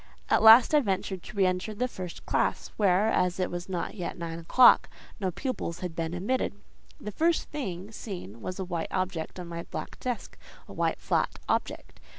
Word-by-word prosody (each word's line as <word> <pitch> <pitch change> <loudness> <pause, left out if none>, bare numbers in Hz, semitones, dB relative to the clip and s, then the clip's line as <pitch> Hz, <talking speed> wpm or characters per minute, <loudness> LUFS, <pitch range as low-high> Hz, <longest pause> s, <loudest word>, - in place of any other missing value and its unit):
At - - +4
last 225 +6 +9
I 300 - +7
ventured 190 -5 -2
to 205 - -11
re 195 - +4
enter 185 +4 -1
the 250 +4 0
first 185 -7 -8
classe, - - 0
where, 200 +1 +3
as 180 -3 +1
it 185 - 0
was 175 +1 -5
not 175 -2 -3
yet 180 -5 -5
nine 165 -1 -5
o'clock, 240 +9 +6 0.3
no 190 -2 0
pupils 180 - -4
had 180 -3 -4
been 165 +1 -2
admitted. 205 +5 -1 0.4
The 210 - -6
first 330 - +1
thing 200 -9 -5
seen 175 - -8
was 185 - -5
a 190 - -3
white 170 -2 -3
object 185 -2 -3
on 180 - -5
my 170 0 -5
black - - -6
desk, 250 -2 -4 0.3
a - - -10
white, - - 0
flat - - 0
object. - - -2
185 Hz, 190 wpm, -28 LUFS, 175-220 Hz, 0.4 s, last